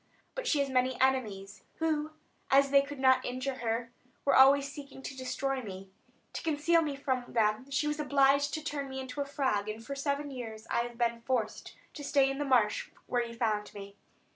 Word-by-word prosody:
But - - -4
she 305 - +3
has 280 - 0
many 255 0 +1
enemies, 215 -7 0
who, 310 -2 0 0.4
as 275 0 +5
they 280 0 +7
could 285 +1 -7
not 260 -1 +4
injure 255 +1 -3
her, 230 0 -2 0.3
were 280 - +4
always 275 +1 +7
seeking 280 -2 -10
to 270 - -6
destroy 265 +1 -2
me. 190 -3 -9 0.4
To - - -4
conceal 325 +2 +2
me 295 -3 -2
from 260 -3 -2
them 225 +3 +1
she 280 +2 0
was 300 0 -2
obliged 280 0 +3
to 310 - -5
turn 285 -3 -3
me 265 0 -5
into 260 +2 -5
a - - -1
frog; 260 -8 0
and 220 +1 -6
for 280 - -4
seven 280 +1 -2
years 225 -4 -7
I - - +2
have 240 0 -3
been 235 -1 0
forced 230 -3 -2 0.2
to 290 - -8
stay 275 -1 +3
in 270 - -5
the 290 - -1
marsh 240 -6 +2 0.2
where 245 -1 0
you 235 0 -8
found 215 -3 -1
me. 200 0 -9
265 Hz, 205 wpm, -31 LUFS, 235-280 Hz, 0.4 s, they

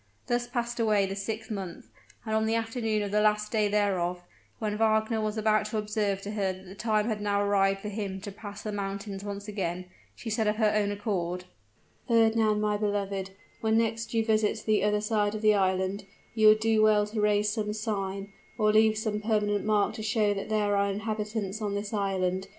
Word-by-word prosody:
Thus 240 0 0
passed 240 -1 -3
away 210 -3 +3
the 195 0 -4
sixth 220 +2 -4
month; 190 -5 -5 0.4
and 220 - -2
on 220 0 +2
the 225 - +1
afternoon 225 -2 -1
of 200 - -4
the 210 +1 +3
last 210 0 +2
day 215 -2 +2
thereof, 185 -4 0 0.3
when 210 -2 -2
Wagner 220 0 +2
was 215 0 -2
about 215 0 +2
to 215 - -3
observe 210 -2 -1
to 205 - -5
her 200 -3 0
that 185 0 -10
the 185 - -10
time 215 0 0
had 215 -3 -2
now 205 -1 +1
arrived 195 -1 +2
for 210 - -4
him 200 -2 -4
to 205 0 -6
pass 205 +1 -9
the 215 - -3
mountains 200 0 -4
once 200 0 -6
again, 185 -3 -3 0.3
she 225 - -6
said 220 0 +1
of 210 - +2
her 215 -1 +2
own 205 -1 +2
accord, 185 -4 -2 0.6
"Fernand, 225 -2 +3
my 210 0 +1
beloved, 200 -2 -2 0.3
when 220 0 +2
next 225 0 0
you 225 -1 +2
visit 215 -1 +1
the 215 -2 +2
other 210 0 +2
side 210 -1 0
of 215 - -5
the 215 0 +6
island, 190 0 0 0.3
you 220 -2 +4
would 215 0 +7
do 220 -1 +3
well 215 -1 +5
to 210 +1 -3
raise 210 0 +2
some 210 -1 -2
sign, 200 -2 -3 0.2
or 215 -2 +3
leave 220 0 +4
some 215 -1 -2
permanent 210 -2 +1
mark 210 -1 +2
to - - -6
show 215 -1 +1
that 200 +1 -5
there 210 -1 +1
are 200 0 +2
inhabitants 210 0 -3
on 205 -1 -2
this 205 +1 -4
island. 190 -2 -1
210 Hz, 205 wpm, -28 LUFS, 200-220 Hz, 0.6 s, would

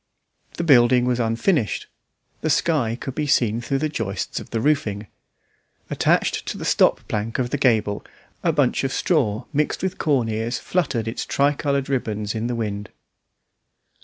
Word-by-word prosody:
The 170 - -1
building 125 -5 +5
was 125 -1 0
unfinished; 115 - 0 0.6
the 155 - -1
sky 140 -7 +1
could 135 - -5
be 150 +2 -2
seen 115 -4 +2
through 135 +3 -1
the 155 +3 0
joists 110 - -3
of - - -10
the 115 - -1
roofing. 110 -7 0 0.9
Attached - - +1
to - - -3
the - - -6
stop - - +3
plank 110 +2 -2
of 125 -1 -1
the - - 0
gable 110 -6 +2 0.4
a - - +3
bunch - - +1
of 135 - -1
straw 125 - 0
mixed 150 +4 0
with 190 -1 -2
corn 135 -7 +2
ears 110 +2 -2
fluttered 130 -11 -1
its 115 - -3
tricoloured 140 -1 +1
ribbons 110 -6 -2
in 115 +1 -2
the 120 - -2
wind. 105 -3 -3
120 Hz, 160 wpm, -22 LUFS, 110-140 Hz, 0.9 s, building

